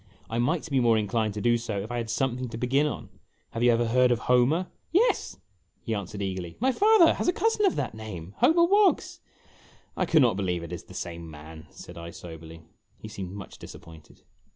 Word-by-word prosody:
I 115 - -1
might 150 +8 0
be 135 - +3
more 115 -2 +4
inclined 110 0 -1
to 105 - -4
do 120 +1 +3
so 110 -3 -3
if 105 +4 -6
I 120 - -2
had 115 -1 -3
something 125 +1 -1
to 115 - -6
begin 135 +5 +2
on. - - -6 0.4
Have 115 - -4
you 120 0 +5
ever 120 0 +2
heard 125 +2 +3
of 120 - +2
Homer?' 125 +8 +3 0.3
"Yes," 420 +9 +1 0.5
he 115 - -2
answered 100 0 -4
eagerly; 95 -3 -5
"my 260 +4 +2
father 410 - +5
has - - -3
a - - +5
cousin 425 +1 +1
of 370 - 0
that - - -2
name 100 -5 -8
Homer 340 +2 +5
W - - -1
T 405 - +6
oggs! - - -6 0.2
' - - -28
" - - -33
I 185 - -1
cannot 130 - +4
believe 90 -4 -1
it 85 +1 -7
is 85 - -7
the - - -13
same 85 -1 -6
man," 80 +1 -11
said - - -11
I, 85 0 -7
soberly. 80 -1 -11 0.3
He - - -10
seemed 95 -3 -7
much 100 -1 -10
disappointed. 80 -2 -13
115 Hz, 225 wpm, -27 LUFS, 90-135 Hz, 0.5 s, T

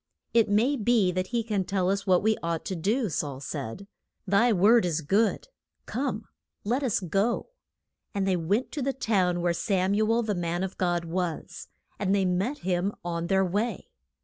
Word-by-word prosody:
It 230 -3 +4
may 230 +8 +3
be 220 -4 +3
that 185 +1 -2
he 235 +1 -1
can 210 -4 -1
tell 185 -1 -1
us 200 +1 -1
what 185 0 +4
we 220 0 +3
ought 165 -1 -2
to 190 - -3
do 215 +8 0
Saul 145 -5 -3
said, 140 - -6 0.4
Thy 205 +5 +3
word 220 +4 +5
is 165 -2 0
good; 200 +9 +1 0.4
come, 245 -5 -3 0.4
let 245 +7 0
us 255 -6 +1
go. 195 - 0 0.6
And 195 -1 -1
they 190 - +3
went 195 +9 0
to 295 - -4
the 270 +1 0
town 185 -8 +1
where 175 0 +1
Sam 190 +1 0
u 215 +2 +2
el, 235 +1 +2
the 215 -2 -1
man 175 0 -2
of 190 0 -4
God, 175 -2 0
was. 170 -1 -4 0.3
And 200 -1 +1
they 195 -1 +2
met 195 +11 0
him 185 +1 +1
on 170 -1 -2
their 190 +1 +3
way. 205 +4 -2
195 Hz, 190 wpm, -27 LUFS, 175-220 Hz, 0.6 s, word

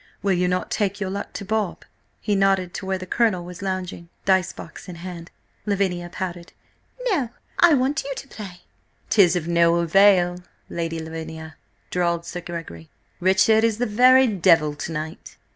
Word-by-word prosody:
Will 200 -1 +2
you 180 0 +1
not 180 0 -1
take 200 -1 -1
your 190 -2 -2
luck 200 +1 -5
to 200 - -6
Bob?" 215 -2 -2 0.4
He 210 - 0
nodded 195 -2 +2
to 190 - -6
where 190 0 0
the 185 - -7
Colonel 185 -3 +1
was 180 +1 -9
lounging, 185 -3 -4 0.2
dice 190 -1 +3
box 165 - -11
in 180 - -7
hand. 170 -1 -8 0.4
Lavinia 185 -4 0
pouted. 175 -1 -6 0.6
"No, 280 - 0 0.3
I 345 -3 +7
want 275 +4 0
you 275 - -5
to 275 - -8
play!" 190 -8 -9 0.5
"'Tis 190 -5 +5
of 170 -2 -2
no 170 0 +4
avail, 175 +1 +4 0.3
Lady 165 -1 -3
Lavinia!" 160 -1 -7 0.4
drawled 170 -1 0
Sir 175 +1 -6
Gregory. 165 - -8 0.3
"Richard 190 +4 +4
is 225 -2 +2
the 245 - 0
very 255 +4 +6
devil 170 -8 +3
to 150 +3 -6
night." 155 0 -6
180 Hz, 170 wpm, -23 LUFS, 170-200 Hz, 0.6 s, I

